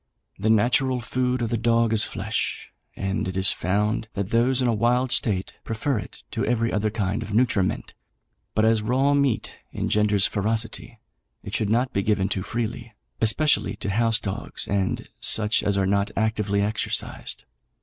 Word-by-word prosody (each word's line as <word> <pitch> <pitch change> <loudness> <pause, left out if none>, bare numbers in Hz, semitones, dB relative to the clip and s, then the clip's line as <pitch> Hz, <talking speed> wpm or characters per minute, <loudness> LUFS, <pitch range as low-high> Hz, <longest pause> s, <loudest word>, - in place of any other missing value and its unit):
The 110 +3 0
natural 125 +4 +3
food 125 +1 -1
of 115 - -2
the 115 - +1
dog 115 -1 +2
is 110 - +4
flesh, 105 +2 -3 0.2
and 95 -1 -2
it 95 0 -4
is 95 -1 +4
found 105 +4 0
that 100 0 -3
those 125 +3 +3
in 125 - +2
a 120 - +2
wild 125 +3 +1
state 100 -6 0
prefer 115 +2 -1
it - - -10
to - - -2
every 115 0 0
other 105 0 +1
kind 105 0 -2
of 105 -1 -4
nutriment, 110 -6 +1 0.6
but 110 - +3
as 110 -1 +3
raw 130 +6 +2
meat 140 -4 +1 0.2
engenders 105 -2 +2
ferocity, 110 +2 -2 0.5
it - - -8
should 105 - 0
not 120 +4 +1
be 100 - +1
given 100 -1 +1
too 95 - -1
freely, 115 +1 -4 0.3
especially 150 +7 +2
to 100 - -2
house 115 +2 +2
dogs 100 +3 -3
and 95 -2 -1
such 110 0 +3
as 100 0 0
are 95 - +2
not 100 +2 +1
actively 105 -2 +1
exercised. 105 - -2
110 Hz, 170 wpm, -24 LUFS, 100-120 Hz, 0.6 s, is